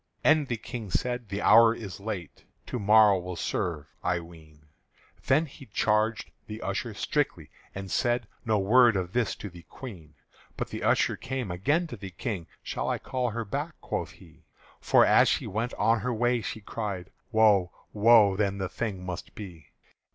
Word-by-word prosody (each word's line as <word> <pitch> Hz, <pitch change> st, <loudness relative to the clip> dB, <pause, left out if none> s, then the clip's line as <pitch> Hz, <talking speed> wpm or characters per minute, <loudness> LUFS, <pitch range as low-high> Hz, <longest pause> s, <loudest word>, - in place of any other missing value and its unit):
And 155 Hz, -2 st, +4 dB
the 120 Hz, -, -2 dB
King 115 Hz, -2 st, -7 dB
said: 120 Hz, +1 st, -2 dB
"The 100 Hz, +1 st, -3 dB
hour 115 Hz, 0 st, +7 dB
is 100 Hz, -6 st, -8 dB
late; 100 Hz, -6 st, -6 dB, 0.2 s
To 125 Hz, -, -4 dB
morrow 105 Hz, -1 st, +6 dB
will 90 Hz, 0 st, -6 dB
serve, 85 Hz, -2 st, -2 dB, 0.2 s
I 90 Hz, -1 st, +1 dB
ween." 80 Hz, -3 st, -15 dB, 0.6 s
Then 145 Hz, +5 st, +4 dB
he 135 Hz, -2 st, -13 dB
charged 110 Hz, +2 st, 0 dB, 0.2 s
the 105 Hz, 0 st, -7 dB
usher 105 Hz, +3 st, -3 dB
strictly, 100 Hz, -, -2 dB, 0.2 s
and 95 Hz, -1 st, -6 dB
said: 120 Hz, -2 st, +1 dB, 0.2 s
"No 110 Hz, -2 st, +1 dB
word 115 Hz, +3 st, +5 dB
of 90 Hz, -1 st, -2 dB
this 120 Hz, -2 st, 0 dB
to -, -, -7 dB
the 85 Hz, 0 st, -12 dB
Queen." 85 Hz, -, -11 dB, 0.4 s
But -, -, -3 dB
the -, -, -6 dB
usher -, -, +2 dB
came 130 Hz, -6 st, -4 dB
again 145 Hz, -, +1 dB
to 125 Hz, -8 st, -8 dB
the 95 Hz, -1 st, -7 dB
King. 90 Hz, -1 st, -5 dB, 0.2 s
"Shall -, -, -3 dB
I -, -, 0 dB
call 125 Hz, -2 st, -2 dB
her 115 Hz, +1 st, -4 dB
back?" 145 Hz, +9 st, -4 dB
quoth -, -, -4 dB
he: 80 Hz, -5 st, -18 dB, 0.4 s
"For -, -, +5 dB
as -, -, +5 dB
she -, -, 0 dB
went 115 Hz, +5 st, -3 dB
on 115 Hz, +2 st, +2 dB
her 125 Hz, +5 st, -2 dB
way, 120 Hz, +1 st, +1 dB
she 110 Hz, -, -5 dB
cried, 100 Hz, -4 st, -5 dB, 0.2 s
'Woe! 105 Hz, -5 st, +4 dB, 0.2 s
Woe! 105 Hz, -2 st, +6 dB
then 100 Hz, -1 st, 0 dB
the 95 Hz, -2 st, -3 dB
thing 100 Hz, -6 st, -4 dB
must 90 Hz, 0 st, -6 dB
be!'" 85 Hz, -8 st, -10 dB
105 Hz, 180 wpm, -28 LUFS, 95-120 Hz, 0.6 s, hour